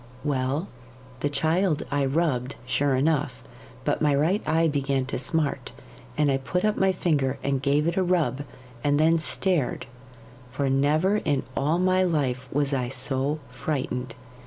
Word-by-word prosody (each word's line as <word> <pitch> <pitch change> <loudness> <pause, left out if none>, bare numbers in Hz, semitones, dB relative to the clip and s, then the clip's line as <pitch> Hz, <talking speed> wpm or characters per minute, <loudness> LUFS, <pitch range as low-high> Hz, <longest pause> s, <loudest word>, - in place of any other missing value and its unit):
'Well, 140 +4 -1 0.5
the 145 - 0
child 160 +2 +1
I 145 -1 +1
rubbed, 135 -3 0
sure 135 +1 +1
enough; 145 -2 0 0.4
but - - 0
my 150 -2 +3
right 165 +9 +2
eye 165 +1 +3
began 140 -3 0
to - - -3
smart, 150 +3 -1 0.4
and 150 -2 +3
I 135 - +2
put 180 +8 -2
up 215 0 +2
my 190 0 +3
finger 145 -7 0
and 135 -1 0
gave 145 +2 +2
it 170 +2 -1
a 190 - +3
rub, 175 -6 +1 0.4
and 145 0 +2
then 165 +1 +4
stared, 160 -4 0 0.6
for 135 +1 -1
never 155 +9 +2
in 145 -9 0
all 150 +5 +1
my 185 +1 +2
life 135 -8 0
was 145 0 0
I 125 -2 -1
so 135 +3 0
frightened. 130 -1 -3
145 Hz, 160 wpm, -25 LUFS, 135-165 Hz, 0.6 s, then